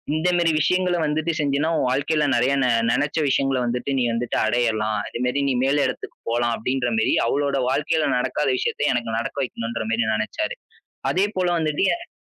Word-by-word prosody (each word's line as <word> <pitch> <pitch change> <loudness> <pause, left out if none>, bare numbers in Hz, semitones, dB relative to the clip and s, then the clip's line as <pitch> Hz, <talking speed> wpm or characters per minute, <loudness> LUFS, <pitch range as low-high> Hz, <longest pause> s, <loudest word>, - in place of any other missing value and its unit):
இந்த 170 +3 +1
மாரி 170 -2 +3
விஷயங்கள 180 +2 +2
வந்துட்டு 155 +2 0
செஞ்சீன்னா, 145 +2 +1
உன் 125 - +1
வாழ்க்கையில 145 +4 +1
நிறைய 125 +3 +2
நெ 125 - +2 0.2
நினைச்ச 145 +4 0
விஷயங்கள 135 0 +1
வந்துட்டு 125 +3 -2
நீ 125 - +2
வந்துட்டு 115 +1 -2
அடையலாம். 110 -2 0
அதுமாரி 125 +3 -1
நீ 130 - +1
மேல 140 +2 +2
இடத்துக்குப் 125 - -8
போலாம் 120 0 +1
அப்பபிடின்றமாரி 120 -1 0
அவரோட 140 +2 0
வாழ்க்கையில 150 +3 +1
நடக்காத 145 +3 -1
விஷயத்த 145 - 0
எனக்கு 120 -2 -2
நடக்க 115 - -4
வைக்கணுன்றமாரி 115 -1 -2
நெனைச்சாரு. 315 - -2 0.6
அதே 185 +2 +2
போல 180 -1 +1
வந்துட்டு 155 -1 0
எனக்கு. 340 0 -9
135 Hz, 160 wpm, -23 LUFS, 120-155 Hz, 0.6 s, மாரி